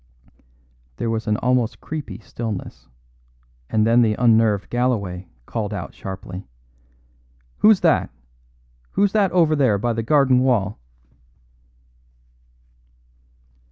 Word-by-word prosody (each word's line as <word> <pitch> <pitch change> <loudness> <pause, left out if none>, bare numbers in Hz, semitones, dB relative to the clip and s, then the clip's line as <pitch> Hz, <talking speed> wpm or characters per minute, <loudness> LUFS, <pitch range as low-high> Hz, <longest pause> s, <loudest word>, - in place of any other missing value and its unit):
There 115 - -2
was 110 0 -3
an 105 0 +1
almost 125 -2 0
creepy 155 -3 -6
stillness, 110 -2 -7 0.8
and 110 -1 +2
then 115 +2 +4
the 110 -2 +2
unnerved 110 -4 +2
Galloway 100 -8 -1 0.2
called 105 - -3
out - - -6
sharply: 95 0 -8 1.1
"Who's 215 -3 +5
that! - - +2 0.8
Who's 200 0 +2
that 200 -3 +2
over 165 -3 +3
there 130 -8 +2
by 120 +3 -1
the 115 - -2
garden 130 +1 +3
wall!" 115 -6 +1
115 Hz, 105 wpm, -21 LUFS, 105-130 Hz, 1.1 s, Who's